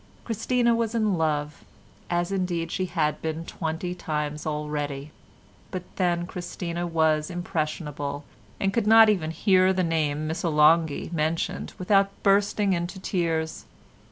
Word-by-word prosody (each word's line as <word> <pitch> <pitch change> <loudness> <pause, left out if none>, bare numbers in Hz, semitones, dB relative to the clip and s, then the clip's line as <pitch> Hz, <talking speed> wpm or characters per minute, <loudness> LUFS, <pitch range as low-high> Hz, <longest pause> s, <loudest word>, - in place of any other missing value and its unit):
Christina 235 +1 +1
was 230 0 -1
in 215 -3 +2
love, 150 -2 -1 0.5
as 175 +1 0
indeed 175 -3 -1
she 185 - -1
had 155 -4 -1
been 160 +1 -3
twenty 165 +2 -3
times 150 -3 -3
already. 150 -1 -3 0.6
But 185 -1 -5
then 175 -2 +1
Christina 175 -1 -4
was 160 -1 +2
impressionable 155 -4 -3 0.4
and 195 0 0
could 225 -2 0
not 225 0 +8
even 180 -7 +1
hear 185 +3 +3
the 185 -1 +1
name 155 -3 0
"Missolonghi" 160 -1 +2
mentioned 160 +1 -1
without 195 +1 +3
bursting 200 0 +3
into 175 +2 -3
tears. 165 -4 -2
170 Hz, 130 wpm, -26 LUFS, 155-190 Hz, 0.6 s, not